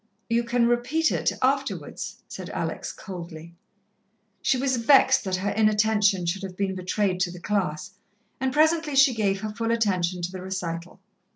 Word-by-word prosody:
"You 235 +1 +2
can 235 0 +1
repeat 245 +7 +1
it - - +1
afterwards," 275 +1 -2
said - - -8
Alex - - -4
coldly. 170 -3 -9 0.9
She 265 - +2
was 260 0 0
vexed 265 +2 +5
that 190 -1 0
her 195 +2 -1
inattention 210 -3 +2
should 170 +4 -1
have 190 -2 -7
been 195 -1 -1
betrayed 185 0 -1
to 180 -1 0
the 180 - -9
class, 185 -3 -2 0.5
and 265 0 0
presently 315 0 +2
she 275 -1 +6
gave 200 -3 0
her 215 -1 -3
full 230 +1 -3
attention 185 -6 0
to 175 - -2
the 185 -1 -7
recital. 180 -1 -5
205 Hz, 165 wpm, -25 LUFS, 185-240 Hz, 0.9 s, she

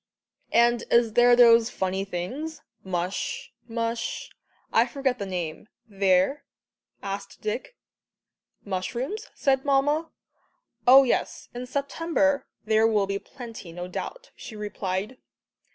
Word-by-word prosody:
"And 235 0 +4
is 235 -2 +4
there 240 +1 +6
those 235 -1 +7
funny 190 -1 -2
things 255 - -5 0.2
mush 180 0 -3
mush 230 0 -3 0.4
I - - +5
forget 270 -3 -1
the 200 - -3
name 175 0 -4 0.2
there?" 195 +6 +2 0.6
asked 195 0 -5
Dick. 220 - -4 0.9
"Mushrooms?" 235 - -3
said 265 -1 +2
Mamma. 290 +3 +2 0.8
"Oh, 265 +2 +10
yes, 255 - -1
in 245 +1 -6
September 285 +1 0 0.2
there 220 +1 +4
will 210 -3 +2
be 200 0 -2
plenty, 230 -8 -10
no 175 +1 -6
doubt," - - -6
she 220 - -10
replied. 205 +2 -3
230 Hz, 115 wpm, -26 LUFS, 195-270 Hz, 0.9 s, Oh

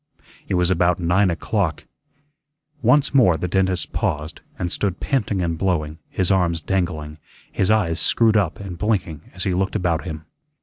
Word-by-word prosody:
It 95 - 0
was 90 0 +2
about 90 0 +2
nine 90 +3 +2
o'clock. 85 -1 -1 1.0
Once 145 -2 +3
more 115 -12 +5
the 90 - -3
dentist 95 0 0
paused, 75 +3 -2 0.2
and 90 -5 -3
stood 95 -3 -1
panting 105 -8 -1
and 85 -1 -2
blowing, 80 -5 -1
his 95 0 0
arms 90 -3 +2
dangling, 80 -4 -2 0.3
his 95 - 0
eyes 95 -7 +2
screwed 110 +7 +3
up 105 +2 +1
and 95 -4 -7
blinking 85 -8 -2
as 90 - -4
he 95 - 0
looked 95 +3 -1
about 85 -5 0
him. 80 -3 -7
90 Hz, 165 wpm, -22 LUFS, 85-100 Hz, 1.0 s, more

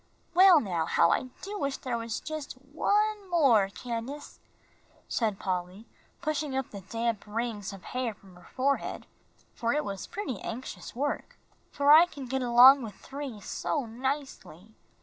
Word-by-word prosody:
"Well 365 -1 +8
now, 175 - -2
how 170 0 +4
I - - +1 0.2
do 410 +1 -5
wish 275 -1 -1
there 250 -2 -3
was 230 -1 -4
just 310 -2 -6
one 400 +10 -1
more, 255 - +4
Candace," 245 +7 -6 0.7
said 215 -4 0
Polly, 185 +3 -4 0.4
pushing 300 -3 -1
up 265 - -3
the 200 - -8
damp 230 +2 -2
rings 215 -2 -3
of 195 -3 -11
hair 245 -1 -3
from 195 -3 -18
her 180 - -17
forehead, 275 +2 -1 0.5
for 235 0 -1
it 300 +1 0
was 195 -2 -5
pretty 300 - -4
anxious 245 +1 -7
work, 285 +4 -3 0.3
"for 285 0 +3
I 325 +3 +9
can 285 -6 -9
get 265 +1 -2
along 250 +3 +8
with 220 -4 -7
three 275 -6 -7
so 280 +7 -2
nicely. 240 - -5
255 Hz, 155 wpm, -29 LUFS, 215-290 Hz, 0.7 s, I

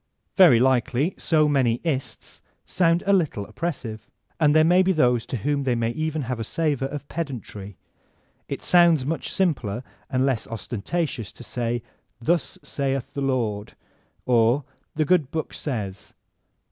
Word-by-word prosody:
Very 175 - +7
likely 130 +5 +2
so 155 -2 +3
many 130 -5 +2
"ists" 140 -6 -4 0.2
sound 170 -1 +2
a 200 - +3
little 155 - +1
oppressive, 110 -5 -5 0.3
and 150 -2 +4
there 155 - +6
may 175 +3 +5
be 190 0 +3
those 125 -7 +2
to 130 - -3
whom 140 +4 -1
diey 125 -3 +1
may 115 0 0
even 155 +3 -2
have 125 -1 -3
a - - -2
savor 145 +1 -1
of 145 0 -7
pedantry. 115 - -6 0.7
It - - -5
sounds 170 -6 +5
much 160 +3 -3
simpler 125 - -1 0.3
and 130 -1 +1
less 130 -5 -1
ostcntatk>us 115 - -3
to - - -11
say 120 0 -2 0.4
''Thus 170 +8 0
saith 135 0 -2
the 140 - -3
Lord,'' 115 -6 -1 0.5
or 120 +3 +3 0.3
''The 155 0 +1
Good 160 -5 +2
Book 160 +1 -4
says. 105 -8 -5
135 Hz, 150 wpm, -24 LUFS, 115-160 Hz, 0.7 s, Very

